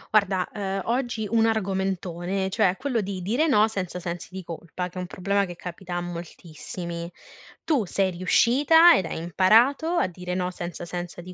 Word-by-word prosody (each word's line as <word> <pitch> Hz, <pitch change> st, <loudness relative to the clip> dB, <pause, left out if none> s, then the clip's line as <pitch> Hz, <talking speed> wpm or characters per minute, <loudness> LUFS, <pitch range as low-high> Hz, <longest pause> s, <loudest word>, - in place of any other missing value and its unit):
Guarda, 195 Hz, -3 st, +3 dB
ehm, 195 Hz, -2 st, -3 dB
oggi 240 Hz, -3 st, -1 dB
un 225 Hz, +1 st, +3 dB
argomentone, 190 Hz, -3 st, -1 dB
cioè 185 Hz, -, +3 dB
è 185 Hz, -, -3 dB
quello 260 Hz, -4 st, -1 dB
di 190 Hz, -2 st, -5 dB
dire 240 Hz, -, +1 dB
no 215 Hz, -7 st, +5 dB
senza 185 Hz, -5 st, -4 dB
sensi 175 Hz, -1 st, -5 dB
di 190 Hz, +1 st, -7 dB
colpa, 170 Hz, +2 st, -6 dB
che 180 Hz, +1 st, -8 dB
è -, -, -2 dB
un 180 Hz, -, -5 dB
problema 200 Hz, +3 st, 0 dB
che 175 Hz, -2 st, -8 dB
capita 180 Hz, +1 st, -7 dB
a 175 Hz, -, -1 dB
moltissimi. 170 Hz, 0 st, -7 dB, 0.5 s
Tu 290 Hz, -8 st, +1 dB
sei 190 Hz, +1 st, 0 dB
riuscita 275 Hz, -, +5 dB
ed 185 Hz, -, +2 dB
hai 165 Hz, -, -4 dB
imparato 220 Hz, -, +3 dB
a 345 Hz, +1 st, +2 dB
dire 180 Hz, 0 st, -6 dB
no 180 Hz, 0 st, -1 dB
senza 175 Hz, -1 st, -6 dB
sensi 175 Hz, 0 st, -6 dB
di 180 Hz, +1 st, -10 dB
185 Hz, 185 wpm, -25 LUFS, 175-220 Hz, 0.5 s, no